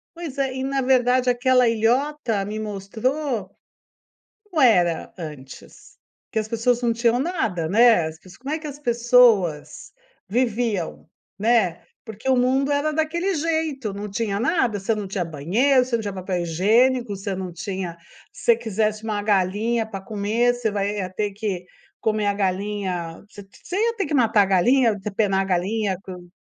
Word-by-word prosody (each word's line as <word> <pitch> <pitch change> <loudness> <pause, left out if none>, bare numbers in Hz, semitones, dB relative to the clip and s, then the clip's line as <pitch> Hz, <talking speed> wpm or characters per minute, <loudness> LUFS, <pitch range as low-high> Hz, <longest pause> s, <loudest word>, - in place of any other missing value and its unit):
Pois 330 -5 -7
é, 270 -2 0
e 260 - -3
na 270 0 -1
verdade 255 -1 +3
aquela 250 0 +3
ilhota 230 0 0
me 210 +2 -5
mostrou 215 +3 -3 0.9
como 360 -7 -2
era 180 -9 +3
antes, 150 -6 -11 0.3
que - - -5
as 215 0 -1
pessoas 235 +2 +1
não 240 -1 +2
tinham 235 +1 +2
nada, 225 - -1
né, 225 -1 +5
as 160 0 -9
pes 185 +1 -16
como 270 +4 -5
é 315 - -2
que 310 - -7
as 290 -1 -7
pessoas 235 - +2 0.3
viviam, 230 -5 -1 0.3
né, 215 -6 +2 0.2
porque 220 +3 -9
o 265 - +4
mundo 265 +3 +2
era 290 +2 +1
daquele 330 +5 -1
jeito, 310 -8 -2
não 205 +1 -6
tinha 205 -1 -2
nada, 245 - +1
você 200 +3 -1
não 210 -2 -4
tinha 190 -1 -2
banheiro, 205 - +2
você 250 -2 -1
não 230 - -1
tinha 205 -2 -4
papel 185 -1 -3
higiênico, 215 +7 +2
você 195 +1 -4
não 185 -2 -5
tinha 185 -1 -5 0.4
se - - -13
você 470 -2 +5
quisesse 215 0 -2
uma 210 -2 -2
galinha 210 +3 +1
pra 195 -3 -6
comer, 220 +4 0
você 240 -2 -1
vai 205 0 -2
ia 185 -2 -3
ter 205 +2 -2
que 195 -3 -4 0.4
comer 215 -1 0
a 205 - +2
galinha, 190 -3 -3
você 205 -3 -11 0.2
você 365 - -4
ia 460 +2 +1
ter 395 - -1
que 295 - -4
matar 225 -5 +4
a 200 - +4
galinha, 230 +6 +3
depenar 200 -1 -1
a 195 - 0
galinha 190 +2 0
com 180 -2 -10
220 Hz, 175 wpm, -23 LUFS, 195-255 Hz, 0.9 s, né